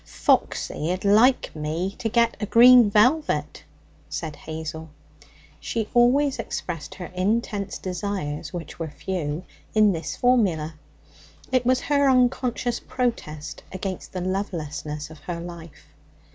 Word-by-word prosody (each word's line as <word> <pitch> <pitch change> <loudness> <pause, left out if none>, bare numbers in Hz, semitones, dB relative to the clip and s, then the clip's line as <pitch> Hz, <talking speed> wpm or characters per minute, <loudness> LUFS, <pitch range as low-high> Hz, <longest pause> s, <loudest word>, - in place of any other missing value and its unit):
'Foxy'd 180 +5 0
like 225 +4 +4
me 160 +5 -2
to 225 - -1
get 235 +1 +2
a 210 - -1
green 240 0 +8
velvet,' 250 +10 +2 0.5
said 160 -4 -4
Hazel. 160 +1 -7 0.7
She 225 -2 -3
always 260 +4 +4
expressed 165 -4 -5
her 180 -1 -8
intense 200 +1 -1
desires, 185 -5 -4
which 170 -4 -7
were 165 -1 -3
few, 160 -1 -4 0.3
in 215 -1 +6
this 165 -3 -4
formula. 190 -11 +2 0.8
It 255 -2 +2
was 255 0 +3
her 285 -1 +3
unconscious 250 -1 +1
protest 155 - -3
against 185 0 -5
the 185 - -4
lovelessness 155 -5 -4
of 155 - -12
her 170 +1 -5
life. 170 -2 -10
190 Hz, 120 wpm, -24 LUFS, 160-240 Hz, 0.8 s, green